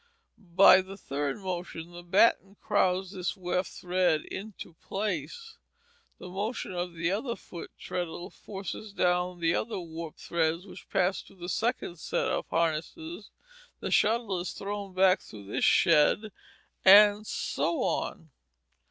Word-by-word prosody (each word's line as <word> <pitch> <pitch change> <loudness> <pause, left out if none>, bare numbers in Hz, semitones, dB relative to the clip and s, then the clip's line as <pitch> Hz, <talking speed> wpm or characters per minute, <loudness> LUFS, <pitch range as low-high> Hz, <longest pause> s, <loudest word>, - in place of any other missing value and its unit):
By 190 0 +8
the 190 +1 -10
third 140 -5 -3
motion 175 -3 -5
the 175 0 -9
batten 195 +2 +3
crowds 185 0 +1
this 185 -1 -3
weft 180 0 -1
thread 180 -3 +1
into 200 -3 -8
place. 205 - -4 0.6
Then 180 - -9
the - - -11
motion 210 +4 -3
of 175 -1 -4
the 165 +1 0
other 230 +4 -2
foot 170 - -9
treadle 175 +1 -5
forces 200 +1 -7
down 180 -1 0
the 165 0 +3
other 220 -2 -2
warp 165 -2 -7
threads 165 +1 -1
which 195 - -12
pass 190 0 +1
through - - -18
the 175 -1 -7
second 225 -6 -1
set - - -1
of - - -2
harnesses, 170 - -2 0.5
the - - -4
shuttle 215 -4 +2
is 175 - -4
thrown 200 -1 -5
back 185 0 +5
through 105 -2 -12
this 100 - 0
shed, 170 +7 +4 0.5
and 205 +2 +7
so 170 - -1
on. 160 -2 -2
185 Hz, 145 wpm, -29 LUFS, 170-200 Hz, 0.6 s, By